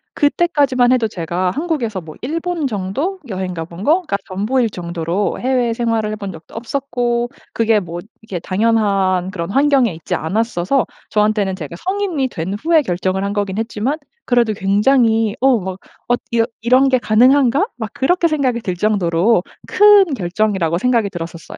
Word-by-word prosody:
그때까지만 285 -5 +2
해도 240 -3 +2
제가 180 -1 -2
한국에서 280 - -2
뭐 160 -2 -11
일본 330 +3 -2
정도? 255 - -3
여행가 185 -4 -4
본 170 +2 -11
거가 320 - +2
전부일 220 +5 0
정도로 170 +1 -3
해외 250 -2 +1
생활을 225 -2 -1
해본 205 -2 -5
적도 160 - -14
없었고 240 0 -2 0.2
그게 225 -1 +2
뭐 175 -2 -6 0.2
이게 210 -5 -6
당연한 195 -2 +1
그런 170 -2 -4
환경에 275 -3 +3
있지 160 - -6
않았어서 215 - 0 0.2
저한테는 210 -2 +1
제가 165 -2 -7
성인이 370 -8 -1
된 185 -4 -4
후에 310 +8 +2
결정을 185 -1 -1
한 200 0 -2
거긴 200 -2 -2
했지만 225 +6 -2 0.3
그래도 240 -3 +2
굉장히 220 +2 +2
어 265 -2 +4
막 190 0 -6 0.3
'엇 245 0 +1
이런 230 -1 +2 0.2
이런 255 +3 +4
게 255 -1 +3
가능한가?' 255 - +4
막 220 -3 -5
그렇게 340 +6 +2
생각이 260 -7 0
들 185 -4 -3
정도로 185 0 +2 0.3
큰 415 -3 +6
결정이라고 185 -4 0
생각이 235 -1 +1
들었었어요. 170 -2 -8
220 Hz, 350 characters per minute, -18 LUFS, 190-260 Hz, 0.3 s, 큰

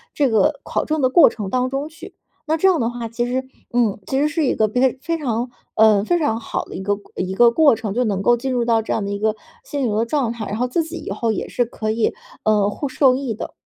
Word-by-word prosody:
这 285 - +3
个 220 +6 +2
考 - - -2
证 310 -1 -1
的 255 - +3
过 335 - +7
程 205 -4 -6
当 255 0 +1
中 275 +3 -3
去。 325 +2 -12 0.3
那 315 +1 0
这 385 - +3
样 345 -7 +2
的 230 - +1
话， 240 -1 -5
其 235 +2 -2
实， 260 +2 -2 0.3
嗯， 235 -4 +2
其 265 - -1
实 295 - +3
是 320 0 0
一 - - +2
个 215 - +2
比 245 +4 -1 0.2
非 330 +3 -2
常， 245 -5 -2 0.3
呃， 215 -2 +5
非 345 +10 +1
常 290 -8 0
好 - - -4
的 - - -10
一 - - -5
个 205 +1 0 0.2
一 185 +1 -3
个 235 +4 +5
过 290 +1 +5
程， 215 -3 -3
就 245 +3 +1
能 200 -5 -1
够 240 +5 +4
进 260 +3 -3
入 245 -2 0
到 230 -1 +3
这 220 - -5
样 210 - -1
的 - - -4
一 200 - -2
个 215 +1 0 0.3
心 290 - -3
灵 210 - -1
的 225 +2 +1
状 240 -2 0
态， 230 -2 -6
然 210 - -3
后 250 +2 0
自 330 +7 0
己 325 +2 -7
以 - - -7
后 220 +3 -1
也 215 - -3
是 245 - 0
可 225 -2 -5
以， 220 0 +1 0.3
呃， 210 -2 +3
获 280 +7 -4
受 260 -1 +4
益 260 -3 -3
的。 215 - -7
240 Hz, 300 characters per minute, -20 LUFS, 220-275 Hz, 0.3 s, 过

